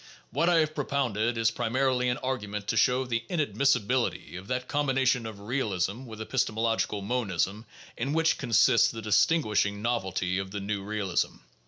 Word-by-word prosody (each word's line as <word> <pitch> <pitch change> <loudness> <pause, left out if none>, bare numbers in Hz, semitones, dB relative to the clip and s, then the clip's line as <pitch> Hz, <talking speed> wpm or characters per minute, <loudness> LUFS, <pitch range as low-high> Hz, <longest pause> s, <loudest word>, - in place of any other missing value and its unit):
What 165 +8 +2
I 175 - +4
have 155 0 -1
propounded 120 -6 -1
is 115 0 +2
primarily 125 +2 +1
an 125 - 0
argument 105 -6 -3
to - - +1
show 130 0 +3
the 115 -2 -2
inadmissibil 135 - +2
ity 80 - -9
of 95 +2 -8
that 125 +1 -2
combination 135 -4 +1
of 105 -2 -8
realism 105 -1 -2
with 110 -3 -10
epistemological 110 -3 -1
monism 105 -2 -1 0.3
in 135 - -2
which 160 +1 +2
consists 120 -1 +4
the 115 -1 -7
distinguishing 105 -3 +2
novelty 95 -6 -1
of 95 0 -4
the 100 +1 -5
"new" 100 0 -3
realism. 100 -3 -1
115 Hz, 160 wpm, -28 LUFS, 105-130 Hz, 0.3 s, I